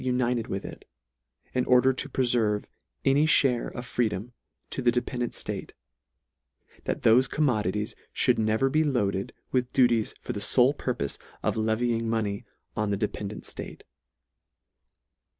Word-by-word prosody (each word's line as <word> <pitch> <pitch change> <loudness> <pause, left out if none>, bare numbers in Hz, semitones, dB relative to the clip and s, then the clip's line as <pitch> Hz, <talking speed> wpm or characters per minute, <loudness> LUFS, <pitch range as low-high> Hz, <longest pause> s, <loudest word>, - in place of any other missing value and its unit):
united 125 -2 0
with 95 - -4
it, - - -9 0.7
in 125 - +1
order 125 +1 +5
to 130 - -3
preferve 115 -5 +1 0.4
any 140 +3 +4
(hare 130 -5 +4
of 120 - -7
freedom 115 -1 -2 0.4
to - - -2
the 120 -1 +4
dependant 120 0 -2
Mate; - - -5 1.1
that - - -2
thofe 125 +4 +5
commodities 105 - 0 0.3
mould 125 -2 +4
never 110 +4 +2
be 155 +4 +2
loaded 100 -9 0 0.2
with 125 -1 0
duties 120 -4 +3
for - - -5
the - - -4
fole 125 +5 +4
purpofe 125 - -3 0.2
of - - +1
levying 115 +1 0
money 105 -3 -1 0.3
on 105 -1 0
the 100 - 0
dependant 105 0 -4
ftate. - - -8
120 Hz, 135 wpm, -27 LUFS, 110-125 Hz, 1.1 s, order